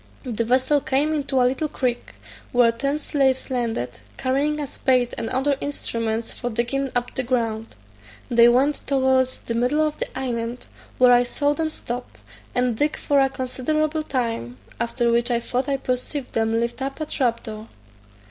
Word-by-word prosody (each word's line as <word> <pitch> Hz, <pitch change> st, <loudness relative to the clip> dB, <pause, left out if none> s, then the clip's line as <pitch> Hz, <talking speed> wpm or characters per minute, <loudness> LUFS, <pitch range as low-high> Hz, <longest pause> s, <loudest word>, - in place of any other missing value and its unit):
The 235 Hz, -4 st, -1 dB
vessel 260 Hz, +4 st, +3 dB
came 285 Hz, +4 st, +1 dB
into 275 Hz, -3 st, 0 dB
a 250 Hz, -, +5 dB
little 265 Hz, +5 st, +1 dB
creek, 245 Hz, -4 st, -2 dB, 0.4 s
where 245 Hz, -1 st, +5 dB
ten 275 Hz, +5 st, -1 dB
slaves 270 Hz, -3 st, 0 dB
landed, 225 Hz, -, -2 dB, 0.2 s
carrying 285 Hz, +4 st, 0 dB
a 295 Hz, -, -1 dB
spade 255 Hz, -3 st, +1 dB
and 225 Hz, -, -3 dB
other 270 Hz, +2 st, +1 dB
instruments 230 Hz, -5 st, -2 dB
for 245 Hz, -, -4 dB
digging 245 Hz, +4 st, -1 dB
up 245 Hz, 0 st, -1 dB
the -, -, -1 dB
ground. 230 Hz, -3 st, -1 dB, 0.5 s
They 235 Hz, 0 st, +6 dB
went 270 Hz, +5 st, +3 dB
towards 260 Hz, -1 st, +2 dB
the 230 Hz, -, -4 dB
middle 250 Hz, +7 st, +2 dB
of 305 Hz, -1 st, -3 dB
the -, -, -1 dB
island, 240 Hz, -2 st, -3 dB, 0.3 s
where 250 Hz, -1 st, +6 dB
I 245 Hz, -, +6 dB
saw 285 Hz, +4 st, 0 dB
them 320 Hz, +1 st, -1 dB
stop, 245 Hz, -5 st, -6 dB, 0.4 s
and 250 Hz, -2 st, +2 dB
dig 295 Hz, +6 st, +1 dB
for 285 Hz, -1 st, +2 dB
a 270 Hz, 0 st, +4 dB
considerable 305 Hz, +5 st, -1 dB
time, 230 Hz, -, -2 dB, 0.2 s
after 235 Hz, 0 st, +1 dB
which 235 Hz, +1 st, +2 dB
I 240 Hz, -1 st, +2 dB
thought 255 Hz, +3 st, -2 dB
I 275 Hz, -, +1 dB
perceived 255 Hz, +1 st, -3 dB
them 225 Hz, 0 st, +1 dB
lift 235 Hz, +3 st, -2 dB
up 270 Hz, +2 st, -3 dB
a 310 Hz, -, -1 dB
trap 245 Hz, -5 st, 0 dB
door. 215 Hz, -1 st, -7 dB
255 Hz, 175 wpm, -23 LUFS, 235-275 Hz, 0.5 s, They